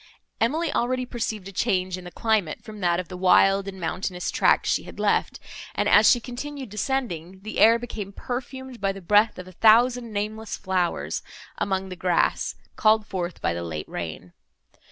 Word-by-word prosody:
Emily 300 +9 +1
already 255 +1 0
perceived 220 -5 -4
a - - -8
change 185 -3 0
in 185 -1 -9
the - - -6
climate, 215 -8 0
from 215 -1 -10
that 175 -2 +1
of 185 - -4
the 185 - -8
wild 195 +2 +4
and 190 -1 -7
mountainous 180 +1 -3
tract - - +3
she - - +1
had - - -11
left; - - +1 0.4
and, - - +1
as - - +7
she 245 - +5
continued 265 +2 -7
descending, 195 - -3
the 215 +2 -5
air 230 +1 +7
became 225 -4 -6
perfumed 260 +2 -6
by 195 0 +1
the 195 - -9
breath 205 +4 +3
of 185 0 -8
a - - -11
thousand 235 +4 +4
nameless 215 +1 -3
flowers 185 -3 -1 0.4
among 190 -1 -1
the 185 - -6
grass, 180 -1 +1 0.2
called 215 0 +3
forth 180 -4 -5
by 85 - +1
the 85 - -4
late 80 -3 -5
rain. 85 +1 -6
200 Hz, 180 wpm, -25 LUFS, 185-235 Hz, 0.4 s, as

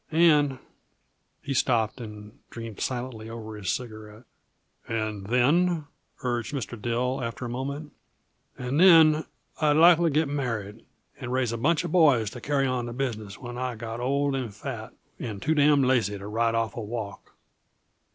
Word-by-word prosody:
And 150 -4 +4 0.4
" - - -46
He 140 - -2
stopped 120 -2 +1
and 105 -1 -10
dreamed 115 -3 -8
silently 120 -3 -4
over 110 -1 -7
his 100 -4 -4
cigarette. 110 -3 -6 0.6
"And 110 -3 -3
then?" 155 +8 +2 0.4
urged 120 +1 -2
Mr. 120 -3 -5
Dill, 125 +3 -1
after 115 +2 -4
a - - -4
moment. 140 +4 -4 0.7
"And 125 +4 -2
then 160 -4 +7 0.4
I'd 150 -1 +4
likely 170 0 +6
get 155 +1 +2
married, 115 -7 -4 0.3
and 125 -3 -5
raise 130 -2 +1
a 115 - -2
bunch 165 +7 +2
uh - - -1
boys 145 - +4
to 125 - -9
carry 140 -1 +1
on 125 -2 -1
the 120 - -5
business 110 -6 -4
when 120 -1 -7
I 125 -1 -2
got 115 +1 -6
old 140 +3 0
and 125 -5 -3
fat, 110 +2 -7 0.2
and 110 -5 -5
too 155 +9 +1
damn' 145 -2 +4
lazy 115 -6 +2
to 100 - -9
ride 115 +2 0
off 115 -2 -1
a 115 - -4
walk." 105 -2 -6
125 Hz, 165 wpm, -26 LUFS, 110-140 Hz, 0.7 s, then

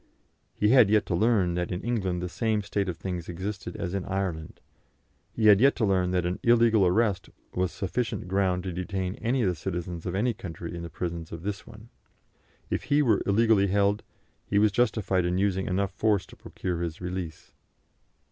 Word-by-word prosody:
He 105 - +2
had 125 -4 +6
yet 105 -1 +3
to 90 - -1
learn 100 -3 +2
that 90 0 -2
in 90 - -4
England 95 -7 -1
the - - -2
same 110 +3 -1
state 100 -1 -1
of 85 - -4
things 90 -3 -5
existed 95 +1 -5
as 85 - -4
in 100 -2 -2
Ireland; 95 -5 -3 0.7
he 110 - -1
had 105 -1 +7
yet 140 +2 +5
to 110 - +1
learn 95 -2 +2
that 90 -1 0
an 90 +1 -2
illegal 115 -4 +4
arrest 100 0 +1 0.2
was 90 -1 0
sufficient 110 -1 -3
ground 95 -1 +1
to 95 -2 -4
detain 95 +1 -3
any 125 +2 +1
of - - +2
the 90 - +1
citizens 85 0 -5
of 90 - -2
any 120 +5 +1
country 85 -4 -7
in 85 - -5
the 85 - -6
prisons 85 0 -5
of 85 0 -7
this 100 0 -4
one. 110 +2 -13 0.8
If - - -2
he 145 +1 +3
were 110 -6 +3
illegally 105 -1 +4
held, 100 +2 +2 0.5
he 100 - 0
was 105 0 +4
justified 105 -5 +1
in 90 +1 0
using 95 -1 0
enough 95 +1 0
force 105 -1 +1
to - - -15
procure 90 -2 -5
his 85 -1 -4
release. 90 -3 -6
95 Hz, 195 wpm, -27 LUFS, 90-105 Hz, 0.8 s, had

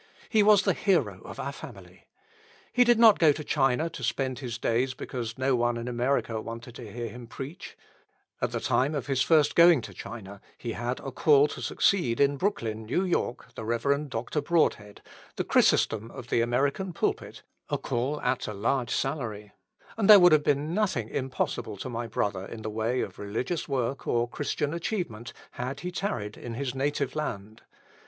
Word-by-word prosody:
He 220 - +4
was 205 -1 +6
the - - +2
hero 195 -2 +1
of - - -9
our - - -3
family. - - -12 0.7
He 250 - +6
did 240 -1 +4
not 225 -3 +7
go 160 -3 +6
to 150 +1 -4
China 135 +1 +1
to - - -8
spend 130 -2 -1
his 120 -5 -5
days 125 +3 0
because 115 -4 -5
no 130 0 +2
one 120 0 +1
in 115 +1 -5
America 120 -2 0
wanted 115 +2 -8
to 115 -4 -9
hear 120 +1 -4
him 120 +2 -10
preach. 140 +8 -8 0.6
At - - 0
the - - -2
time 140 +4 +1
of 140 -5 -3
his 135 -1 0
first 155 -1 +4
going 170 -3 +7
to 100 - -9
China 100 0 -9 0.2
he 120 - -5
had 120 +3 -3
a 135 - -6
call 145 +2 +5
to - - -7
succeed 150 -13 +1
in 140 0 +3
Brooklyn, 110 - -2
N.Y., 175 -7 +1 0.2
the - - -7
Rev. 140 +6 0
Dr. 125 +5 -2
Broadhead, 145 -10 0 0.3
the - - -1
Chrysostom 110 +1 +2
of 125 -1 -10
the 115 - +2
American 140 +10 0
pulpit, - - -2 0.3
a - - 0
call 130 +5 -2
at 130 - -1
a 105 - -5
large 120 +4 0
salary; 110 -8 -3 0.5
and 220 -2 +1
there 210 -2 +11
would 180 -1 +7
have 155 -1 +6
been 145 +3 0
nothing 185 - 0
impossible 130 -5 -3
to 130 - -6
my 120 -1 -4
brother 100 -3 -2
in 110 -1 -8
the 110 - -4
way 110 +4 -1
of - - -6
religious 115 +11 -3
work 135 0 -2
or 120 0 +1
Christian 145 +3 -2
achievement 170 - -3 0.2
had 125 +2 -5
he 180 - -4
tarried 120 - -3
in 120 -2 -7
his 130 0 -3
native 140 0 -1
land. 110 -8 -5
130 Hz, 185 wpm, -27 LUFS, 115-150 Hz, 0.7 s, there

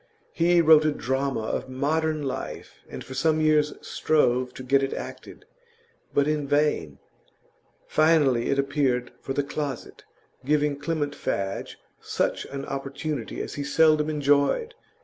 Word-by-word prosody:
He 175 +1 +4
wrote 160 -1 +7
a 155 - +2
drama 135 -1 -1
of 110 - -3
modern 155 +3 -1
life, 135 -2 -6
and - - -7
for 130 - -9
some 155 +4 +1
years 155 -1 +2
strove 125 -5 +1
to 130 - -8
get 135 +2 +3
it 135 - -1
acted, - - -9 0.7
but 140 0 +2
in 150 -2 -1
vain; 145 - +1 0.9
finally 150 -6 +3
it 140 - +1
appeared 135 -3 0
'for 135 - -4
the 145 - 0
closet' 140 -1 -5 0.4
giving 145 0 +1
Clement 145 -1 -2
Fadge 100 -7 -3 0.2
such - - -2
an 140 0 -6
opportunity 140 -1 -4
as - - -7
he 145 - -4
seldom 155 +1 +3
enjoyed. 145 - +1
145 Hz, 140 wpm, -25 LUFS, 135-155 Hz, 0.9 s, wrote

